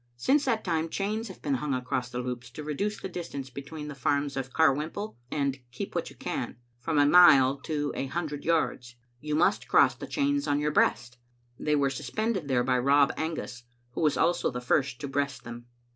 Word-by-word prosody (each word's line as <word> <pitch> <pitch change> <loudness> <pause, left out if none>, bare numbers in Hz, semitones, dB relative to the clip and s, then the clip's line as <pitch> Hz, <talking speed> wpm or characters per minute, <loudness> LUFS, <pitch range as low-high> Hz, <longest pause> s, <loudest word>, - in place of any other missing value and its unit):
Since 275 - +2
that 230 -4 0
time 165 -2 -1
chains 215 +6 -2
have 190 - -12
been 145 - 0
hung 135 +1 -1
across 125 0 -2
the 125 - -6
Loups 125 -1 -5
to 150 - -7
reduce 200 +8 -2
the - - -5
distance 155 -7 -6
between 150 +3 -7
the 150 - -6
farms 140 +1 0
of 135 -1 -4
Carwhimple 160 +8 +1
and 140 -2 -1
Keep 125 - -6
What - - -2
You - - -15
Can - - -4 0.2
from 155 +5 -1
a 145 - +6
mile 140 -5 +7
to 145 0 -3
a 135 - -2
hundred 150 -1 -4
yards. 140 -7 0 0.2
You 150 +2 -3
must 160 - +2
cross - - +5
the - - -8
chains 285 0 0
on 145 - +2
your 150 0 0
breast. 125 -4 +1 0.4
They 150 0 +1
were 140 -2 +2
suspended 170 - -2
there 125 -3 +2
by 125 0 +2
Rob 140 +2 +4
Angus, 160 -6 -4 0.3
who - - -4
was 150 -3 +2
also 175 0 +2
the 125 - -4
first 125 +1 0
to 145 - -3
breast 140 0 -2
them. 120 0 -9
145 Hz, 205 wpm, -28 LUFS, 130-165 Hz, 0.4 s, mile